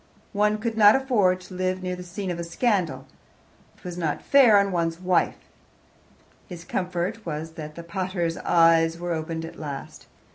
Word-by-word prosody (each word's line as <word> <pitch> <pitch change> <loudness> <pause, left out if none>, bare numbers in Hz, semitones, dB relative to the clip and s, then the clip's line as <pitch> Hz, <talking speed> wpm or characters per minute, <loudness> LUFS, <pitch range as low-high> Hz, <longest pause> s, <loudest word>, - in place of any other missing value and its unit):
One 210 +1 +2
could 225 0 -3
not 205 0 +8
afford 210 -9 +2
to 185 - -12
live 185 0 -2
near 180 0 -2
the 180 - -9
scene 180 +2 -5
of 170 - -5
a - - -3
scandal 185 0 -1 0.7
it - - -25
was 180 -1 -6
not 160 -3 -2
fair 255 -7 +6
on 200 0 +2
one's 165 -1 -1
wife. 180 -1 +1 1.1
His 175 -2 -9
comfort 180 +5 -3
was 160 0 -5
that 155 -2 -9
the 170 - -8
pater's 175 -1 -3
eyes 165 -1 +3
were 175 0 -3
opened 160 0 -4
at 165 - -11
last. 145 -3 -7
180 Hz, 175 wpm, -25 LUFS, 165-200 Hz, 1.1 s, not